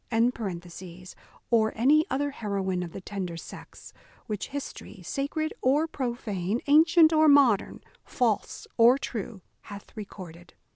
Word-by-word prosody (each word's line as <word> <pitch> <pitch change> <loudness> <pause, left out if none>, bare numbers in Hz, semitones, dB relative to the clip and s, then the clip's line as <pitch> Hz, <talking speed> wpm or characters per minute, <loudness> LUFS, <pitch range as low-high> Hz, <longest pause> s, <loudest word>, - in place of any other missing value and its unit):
] 185 -7 -5
or 220 -2 +3
any 295 - +3
other 285 +2 -1
heroine 195 -6 -3
of 175 -2 -6
the - - -7
tender 185 -3 -5
sex, - - -12 0.3
which 210 -2 -4
history, 285 0 -8
sacred 310 +3 -3
or 285 +5 +3
profane, 235 - -3
ancient 320 +2 +5
or 310 0 +5
modern, 275 -8 +4 0.2
false 230 -5 -1
or 235 +3 +6
true, 220 -6 -6 0.2
hath 205 +2 -11
recorded. 180 -5 -10
225 Hz, 125 wpm, -27 LUFS, 190-280 Hz, 0.3 s, or